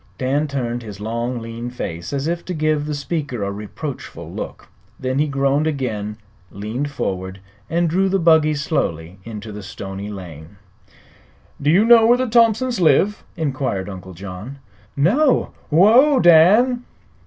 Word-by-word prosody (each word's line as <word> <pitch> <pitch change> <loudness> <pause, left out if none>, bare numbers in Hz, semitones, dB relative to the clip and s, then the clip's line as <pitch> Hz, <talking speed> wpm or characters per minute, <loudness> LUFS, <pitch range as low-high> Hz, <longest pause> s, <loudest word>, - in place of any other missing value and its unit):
Dan 140 +4 0
turned 120 -4 -3
his 105 -4 -9
long, 115 +4 -3
lean 115 +1 -6
face 85 -8 -6
as 140 0 -2
if 170 +1 -2
to 180 - -4
give 155 -1 0
the 150 - -2
speaker 140 -6 -3
a 100 - -2
reproachful 105 +8 -7
look; - - -7 0.3
then 130 +1 -1
he 150 - +2
groaned 140 +2 +1
again, 110 -8 -3 0.3
leaned 110 - -4
forward, 95 -8 -4 0.3
and 170 +1 +1
drew 190 +4 +1
the 195 - +2
buggy 160 -3 +4
slowly 95 - -2
into 110 -1 -7
the 105 0 -7
stony 95 +1 -7
lane. 85 -3 -9 1.1
"Do 145 - +1
you 190 +7 +5
know 230 -1 +7
where 240 +1 +5
the 255 - 0
Thompsons 235 +1 +2
live?" 195 +5 +3
inquired 130 - -2
Uncle 95 -1 -9
John. 100 +8 -8 0.4
"No. 250 - +3 0.2
Whoa, 235 - +5
Dan!" 210 +9 +5
140 Hz, 150 wpm, -20 LUFS, 105-170 Hz, 1.1 s, know